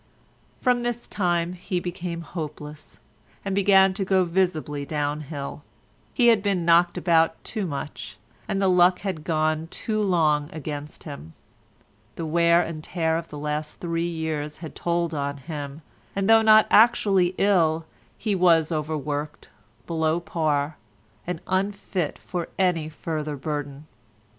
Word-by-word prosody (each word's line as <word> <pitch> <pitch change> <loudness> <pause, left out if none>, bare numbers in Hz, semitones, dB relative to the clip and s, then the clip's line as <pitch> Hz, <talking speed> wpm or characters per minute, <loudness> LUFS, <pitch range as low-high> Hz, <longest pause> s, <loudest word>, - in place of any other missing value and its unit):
From 250 -2 +2
this 240 0 -3
time 175 -2 0
he 180 0 -3
became 175 -1 -5
hopeless, 150 -2 -8 0.5
and 195 - -1
began 195 -1 +5
to 195 +1 -2
go 190 -1 +3
visibly 170 -5 -1
down 150 0 -2
hill. 145 -1 -6 0.5
He 240 -3 +5
had 225 -3 +4
been 195 -4 0
knocked 170 +1 +4
about 165 -2 +3
too 205 -4 -3
much, 145 -1 -6 0.3
and 195 - -1
the 195 - +2
luck 180 0 +4
had 185 -6 -4
gone 155 0 0
too 215 +5 -3
long 155 -6 +2
against 150 -1 -6
him. 140 - -9 0.8
The 165 - -4
wear 170 +2 +4
and 155 -2 -6
tear 160 -2 0
of 165 0 -3
the 150 - -9
last 150 +1 -4
three 170 0 -1
years 155 -2 -3
had 160 -2 -8
told 170 -1 -1
on 140 -1 -2
him, 145 +1 -7 0.3
and 195 0 0
though 225 0 +7
not 215 0 +7
actually 195 -5 +4
ill 165 -5 +2 0.3
he 215 - -1
was 170 -4 +4
overworked, 150 -1 -3 0.4
below 160 0 0
par, 155 -3 -1 0.5
and 180 -2 -3
unfit 190 -3 -2
for 175 -2 -5
any 175 -5 +1
further 155 -1 -4
burden. 145 0 -5
165 Hz, 145 wpm, -25 LUFS, 150-185 Hz, 0.8 s, though